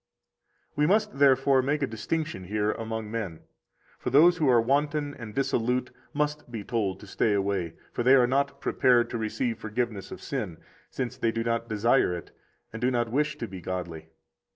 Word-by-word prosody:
58 - - -37
We 150 0 +3
must, 210 -4 +1
therefore, 135 -1 +5
make 145 +3 0
a - - +4
distinction 130 - -3
here 105 +2 0
among 110 -1 -5
men. 100 -8 -4 0.6
For - - -2
those 165 +7 +6
who 155 -5 +2
are 120 -2 +6
wanton 145 +4 0
and 115 -5 -9
dissolute 125 -1 0 0.2
must 150 -1 -2
be 110 -3 -5
told 100 -5 -1
to - - -10
stay 105 +2 +1
away; 100 -4 -1 0.2
for - - -2
they 130 +3 +6
are 125 -2 +6
not 140 +3 0
prepared 120 -2 +3
to 120 - -2
receive 110 +1 -2
forgiveness 110 -2 -3
of - - -8
sin, 105 - -4 0.3
since 125 -3 -4
they 115 - +1
do 115 0 -2
not 115 0 -1
desire 110 -3 +2
it 85 - -9 0.4
and 110 - -6
do 125 - +3
not 120 -2 0
wish 150 +3 0
to 120 - -4
be 95 -2 -8
godly. 85 -3 -5
120 Hz, 190 wpm, -27 LUFS, 105-135 Hz, 0.6 s, those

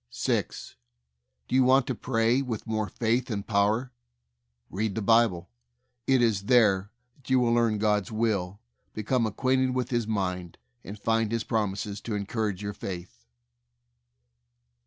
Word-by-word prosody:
6. - - -2 0.7
Do - - -7
you 130 0 +5
want 130 0 +4
to 130 - -2
pray 115 +2 +1
with 120 -5 -4
more 110 -2 -2
faith 120 +2 0
and 100 -3 -3
power? 110 +4 +1 0.8
Read 105 +1 -2
the 110 - -2
Bible. 115 -6 +3 0.6
It 130 -2 +4
is 105 -4 +1
there 105 -6 +4 0.3
that 135 -3 -16
you 130 0 +4
will 120 -1 +2
learn 115 -2 +2
God's 105 -2 0
will, 105 -4 -1 0.4
become 115 +2 0
ac 105 - -6
quainted 130 -1 +1
with 130 0 -2
His 120 -3 0
mind, 90 -5 -3 0.3
and 100 +3 -8
find 115 +1 0
His 115 -1 -1
prom 105 -4 -1
ises 100 0 -5
to 110 - -4
encourage 105 -1 -2
your 100 0 -3
faith. 90 -8 -8
110 Hz, 155 wpm, -27 LUFS, 100-120 Hz, 0.8 s, you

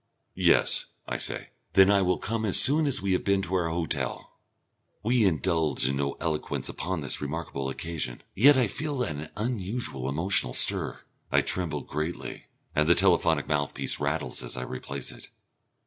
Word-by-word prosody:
"Yes," - - +2 0.2
I - - -3
say, - - -4 0.2
"then 95 +1 +6
I 100 -1 +4
will 90 -1 +2
come 115 +1 -3
as 100 -4 +4
soon 150 +2 +4
as 135 -1 0
we 100 - 0
have 90 - 0
been 100 -1 +1
to 90 - -3
our 90 -3 +1
hotel." 80 -6 -3 0.7
We 120 0 +3
indulge 80 -6 +1
in 70 +1 -1
no 70 0 -1
eloquence 80 -2 -2
upon 90 -1 -3
this 70 - 0
remarkable 70 -2 -4
occasion. 75 -3 -4
Yet 140 +6 +6
I 130 - +4
feel 140 +5 -3
an 75 -6 -5
unusual 105 - -2
emotional 75 -4 +1
stir. - - +3 0.3
I - - +4
tremble 80 -5 -1
greatly, 80 +5 -5 0.3
and 75 +1 +2
the 85 - +7
telephonic 85 -5 +3
mouthpiece 75 -1 0
rattles 75 +2 -1
as - - -4
I 65 - -3
replace 65 +1 -5
it. - - -12
85 Hz, 165 wpm, -27 LUFS, 75-100 Hz, 0.7 s, the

